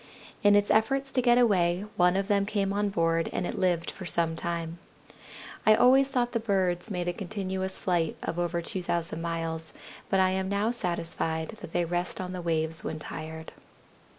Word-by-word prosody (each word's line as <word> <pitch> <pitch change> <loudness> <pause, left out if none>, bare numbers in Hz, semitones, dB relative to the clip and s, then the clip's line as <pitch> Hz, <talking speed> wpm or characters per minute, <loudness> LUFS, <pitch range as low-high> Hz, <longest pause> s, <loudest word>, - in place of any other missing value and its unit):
In 205 -1 +6
its 205 0 +3
efforts 270 +5 +2
to 255 - +2
get 240 -1 +4
away 190 -5 +3
one 180 0 +4
of 195 0 -1
them 200 -1 +2
came 200 -2 0
on 205 0 +1
board 165 -3 +1
and 180 - -2
it - - -4
lived 175 -3 +1
for - - -10
some 165 0 0
time. 170 0 -4 0.8
I 215 - +6
always 265 +4 +5
thought 245 -3 0
the 230 - 0
birds 190 -3 0
made 180 -3 -3
a 175 - 0
continuous 190 -1 -3
flight 170 -4 0
of 170 - -3
over 170 0 -1
2,000 170 -2 -1
miles, 165 -1 -3 0.4
but 195 - +2
I 185 0 +4
am 190 0 -1
now 200 +3 +1
satisfied 165 -6 -2
that - - -8
they 175 0 +1
rest 175 +1 -2
on 185 0 -4
the 180 - -4
waves 160 -1 -1
when - - -3
tired." 160 +1 -7
180 Hz, 185 wpm, -28 LUFS, 170-205 Hz, 0.8 s, In